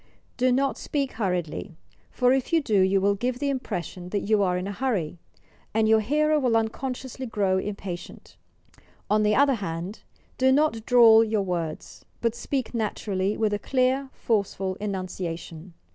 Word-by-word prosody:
Do 255 0 +2
not 270 +2 +1
speak 280 -3 -2
hurriedly, 180 -4 -3 0.3
for 250 0 +2
if 265 +3 -1
you 335 - +4
do 220 -9 +1
you 190 +1 +3
will 200 +1 +3
give 245 +5 -2
the 280 +1 -1
impression 180 - -5
that 205 +1 -1
you 210 +1 +2
are 180 -2 +1
in 180 - -3
a 200 - -3
hurry, 200 -8 -2 0.6
and 220 0 +3
your 220 0 +5
hearer 300 +7 +2
will 245 -5 +2
unconsciously 255 +3 -3
grow 195 -4 +1
impatient. 190 -3 -7 0.8
On 210 0 +4
the 210 0 +3
other 280 0 +4
hand, 185 -2 -5 0.4
do 260 0 +4
not 265 -6 +1
drawl 230 -2 +7
your 215 -2 0
words, 170 -4 -4 0.2
but 230 -1 0
speak 240 0 -3
naturally 205 -3 -1
with 215 -2 +1
a 205 - -1
clear, 260 +3 +1
forceful 195 -3 -1
enunciation. 180 -4 -5
215 Hz, 160 wpm, -25 LUFS, 190-255 Hz, 0.8 s, drawl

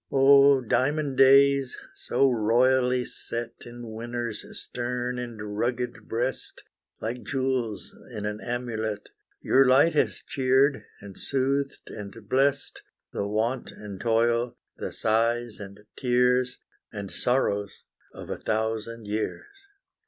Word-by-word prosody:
Oh, 140 0 +6
diamond 140 +3 0
days, 135 0 +5 0.2
so 135 - +1
royally 125 +2 +3
set 115 0 -5 0.2
In 120 -1 -9
winter's 120 0 -4 0.2
stern 125 0 -3
and 110 -4 -6
rugged 125 +1 -2
breast, 120 +3 -3 0.4
Like 120 +3 -4
jewels 130 -6 -2 0.2
in 105 -3 -5
an 105 0 -4
amulet, 110 -4 -3 0.3
Your 135 - +5
light 140 +6 +5
has 150 - 0
cheered, 135 +1 +2 0.2
and 100 -1 -10
soothed, 135 +1 -1
and 100 -1 -8
blest, 135 +3 +1 0.3
The 100 - -2
want 115 +5 -1
and 100 -3 -9
toil, 115 +1 +1 0.2
the - - -5
sighs 115 +1 0
and 100 0 -10
tears, 125 0 +2 0.3
And 100 -3 -6
sorrows 105 -5 -1 0.3
of - - -9
a - - -3
thousand 110 +1 -2
years! 395 - -5
120 Hz, 115 wpm, -26 LUFS, 110-130 Hz, 0.4 s, Oh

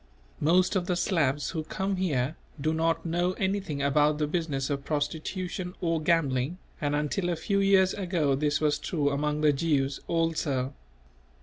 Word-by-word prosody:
Most 180 +6 +3
of 180 -2 0
the 180 - +1
Slavs 150 -6 +1
who 160 -2 -3
come 190 +3 -2
here 150 -6 0 0.2
do 155 +3 0
not 165 +1 0
know 175 +2 +1
anything 190 -7 -2
about 150 +2 +3
the 150 - +1
business 150 -4 -2
of 140 -1 -2
prostitution 175 +5 -3
or 165 -2 0
gambling; 155 -2 +1 0.2
and 145 -1 0
until 150 +5 -1
a 175 - +1
few 200 +5 0
years 195 -1 +4
ago 170 -7 0
this 145 +1 +1
was 150 -1 +1
true 145 -4 0
among 150 +1 -1
the 150 -1 +4
Jews 140 -2 0
also. 155 -5 0
155 Hz, 165 wpm, -28 LUFS, 145-180 Hz, 0.2 s, years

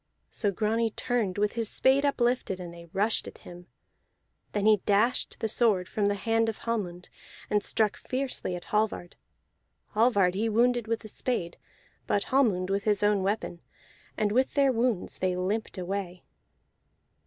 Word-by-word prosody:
So 210 - 0
Grani 220 +4 0
turned 220 -4 -2
with 210 0 +1
his 230 -2 -2
spade 275 +2 +3
uplifted, 240 -7 0
and 175 -1 -7
they 170 0 -12
rushed 205 +6 0
at - - -10
him. 175 0 -12 0.8
Then 205 -1 -1
he 215 -1 +6
dashed 205 +5 +1
the 225 - -1
sword 210 -5 +2
from 205 +1 0
the 205 - +1
hand 225 +2 +1
of 220 - -4
Hallmund, 185 -7 -3 0.4
and 210 - +3
struck 215 0 +1
fiercely 255 -8 -3
at 175 - -7
Hallvard. 210 -4 0 0.8
Hallvard 210 -5 +3
he 220 +4 0
wounded 240 +1 +2
with 230 0 -1
the 215 - -9
spade, 200 -6 -3 0.5
but 200 - +2
Hallmund 195 -9 +2
with 200 +1 -1
his 210 -1 +1
own 205 -1 +3
weapon, 190 -3 -2 0.6
and 210 -1 +1
with 255 +4 +1
their 275 -2 +4
wounds 230 -5 -1
they 185 -1 0
limped 200 +5 -2
away. 185 -1 -4
210 Hz, 160 wpm, -28 LUFS, 190-230 Hz, 0.8 s, he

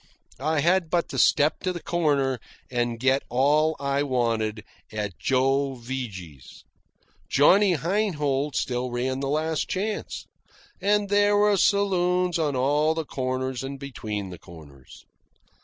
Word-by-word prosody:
I 155 +2 0
had 175 +1 +2
but 170 0 0
to - - -3
step 150 +1 +3
to 185 - -2
the 175 - -5
corner 145 -7 0 0.3
and 120 -2 -1
get 130 +2 +2
all 150 +5 +2
I 140 0 0
wanted 115 -5 -1 0.3
at 105 -4 -4
Joe 135 +1 +1
Vigy's. 105 - -8 0.7
Johnny 185 +6 +5
Heinhold 150 -7 -1
still 125 0 -1
ran 130 +2 -2
the 135 0 -2
Last 155 +1 -1
Chance. 210 +3 -3 0.6
And 205 +1 +2
there 205 0 +3
were 205 0 +4
saloons 180 -3 +2
on 150 -4 0
all 145 +5 +2
the 160 -1 -3
corners 130 -1 -3
and 135 0 -6
between 105 -8 -5
the 90 - -9
corners. 70 -6 -15
140 Hz, 135 wpm, -25 LUFS, 125-170 Hz, 0.7 s, Johnny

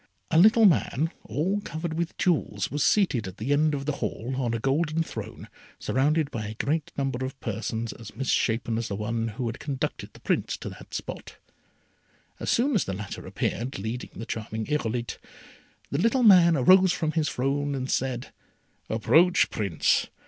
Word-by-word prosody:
A 160 - +3
little 220 +4 +7
man 160 - +2
all 170 - -1
covered 160 -2 -4
with 170 +1 -3
jewels 145 - 0
was 145 0 0
seated 135 - +2
at 95 +2 -9
the 130 +7 0
end 150 +1 +2
of 140 -1 -4
the 150 -1 -2
Hall 115 +3 -3
on 125 -3 -1
a - - -2
golden 155 +6 +1
throne - - -8 0.3
surrounded 150 +3 +1
by 110 -5 -4
a 105 - -5
great 150 +6 -1
number 135 -2 -1
of 130 +1 -5
persons 115 +1 -3
as 115 -3 -11
misshapen 115 -2 0
as 115 - -3
the 100 - -3
one 115 +2 -2
who 115 +3 -4
had 115 +1 -4
conducted 145 +1 -4
the - - -15
Prince - - -1
to - - -6
that - - -11
spot. - - -7 1.0
As - - -3
soon 270 +5 +2
as 205 - +2
the 95 - -3
latter 100 +1 -6
appeared 120 +5 -2
leading 110 +5 -4
the 115 - -6
charming 110 0 -4
Irolite, 120 -5 -2 0.7
the 140 - 0
little 245 +4 +3
man 180 -6 +7
rose 185 +7 +6
from 160 -3 -1
his 155 -3 0
throne 140 +3 -1
and 130 -1 -3
said, 130 -2 -2 0.6
"Approach, 155 +12 +4
Prince. 100 -7 +1
135 Hz, 180 wpm, -26 LUFS, 115-160 Hz, 1.0 s, little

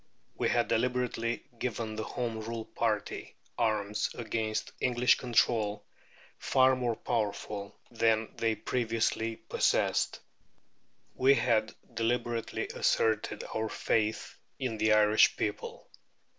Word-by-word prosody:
We - - 0
had 120 -2 +2
deliberately 120 0 0 0.2
given 115 -3 -3
the 110 - -3
Home 115 -1 -3
Rule 115 0 -5
party 110 -3 -2 0.2
arms 105 -2 0
against 110 -1 -2
English 125 0 +3
control 110 -4 +1 0.5
far 130 -1 +4
more 120 -2 -1
powerful 105 -3 -3 0.2
than 110 -1 +1
they 115 -1 0
previously 115 0 -1
possessed. - - +1 0.9
We 135 +2 +4
had 110 -3 +1 0.2
deliberately 115 0 -1
asserted 110 -1 +1
our 110 0 -1
faith 110 0 -1 0.2
in 120 -5 -3
the 110 0 +4
Irish 105 0 +5
people. 105 -1 -4
115 Hz, 105 wpm, -30 LUFS, 110-120 Hz, 0.9 s, Irish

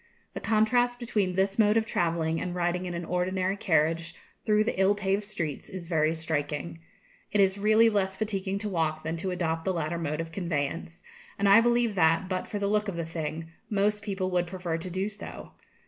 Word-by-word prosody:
The - - -4
contrast 245 +3 +2
between 210 -6 0
this 195 +2 +1
mode 210 0 +5
of 225 - +2
travelling 165 -4 0
and 180 -1 -3
riding 180 +1 0
in 175 - -4
an 170 0 -4
ordinary 185 +2 0
carriage 165 -2 +1 0.3
through 210 0 +4
the 205 -3 -1
ill 195 +2 +4
paved 195 0 0
streets 170 -9 -4
is 185 -3 -7
very 160 -1 +2
striking. 160 0 -3 0.5
It 210 - +1
is 195 0 +3
really 215 +2 +5
less 190 -3 0
fatiguing 195 -3 -2
to 215 - -2
walk 160 -4 -1
than 160 +1 -2
to 185 +3 -2
adopt 165 -3 -1
the 190 - 0
latter 170 0 -2
mode 155 -2 -2
of 165 0 -4
conveyance, 165 -1 -3 0.3
and 200 - +2
I 200 +3 +8
believe 240 -1 +2
that, 165 -1 +3
but 185 -1 -2
for 210 - -4
the 200 - -1
look 210 +1 +1
of 195 - -3
the 170 -1 -3
thing, 165 0 -5 0.2
most 210 0 +1
people 190 -3 -2
would 175 -1 +1
prefer 180 -2 -3
to 165 +3 -5
do 190 +3 -1
so. 210 -1 -9
185 Hz, 205 wpm, -28 LUFS, 165-205 Hz, 0.5 s, I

